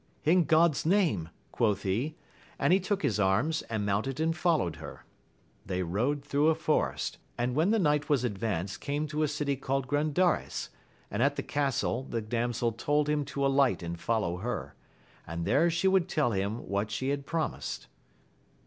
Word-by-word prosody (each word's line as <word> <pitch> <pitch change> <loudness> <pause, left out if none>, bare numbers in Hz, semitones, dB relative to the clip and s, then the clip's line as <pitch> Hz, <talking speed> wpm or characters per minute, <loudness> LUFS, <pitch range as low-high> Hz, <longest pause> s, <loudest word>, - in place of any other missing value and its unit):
In 170 +2 +4
God's 160 -1 +4
name, 160 - +2 0.2
quoth 105 -5 +1
he, 120 +11 -1 0.4
and - - +3
he 190 - +5
took 195 +1 -2
his 105 - +1
arms, 110 +12 +2
and 110 -2 -1
mounted 110 +8 -1
and 160 +1 +1
fol 170 -2 +3
lowed 85 - -2
her. - - -10 0.6
They 95 -3 -2
rode 125 - -1
through 145 +1 +2
a 160 - +4
forest, 155 -1 -1 0.2
and 125 +1 0
when 160 +8 +2
the 225 - +3
night 150 -5 +1
was 140 -4 +3
advanced 100 -5 -2
came 145 +1 -1
to 155 +1 -2
a 155 - +3
city 145 -1 -1
called 135 0 -1
Grandares, 155 +5 +1 0.4
and 105 - -1
at 140 +2 +3
the - - -3
castle 135 -3 0
the 125 -3 -3
damsel 120 +1 -1
told 145 +6 0
him 150 -1 +1
to 140 - -5
aUght 135 -6 +3
and 85 0 -5
follow 105 -6 0
her, 120 +7 -4 0.5
and 85 +1 -4
there 170 +4 +3
she 170 +3 +1
would 190 -2 +3
tell 150 -9 +1
him 100 +3 -2
what 100 +2 -1
she 130 +5 -2
had 140 0 -2
promised. 165 -2 -3
140 Hz, 180 wpm, -29 LUFS, 110-155 Hz, 0.6 s, he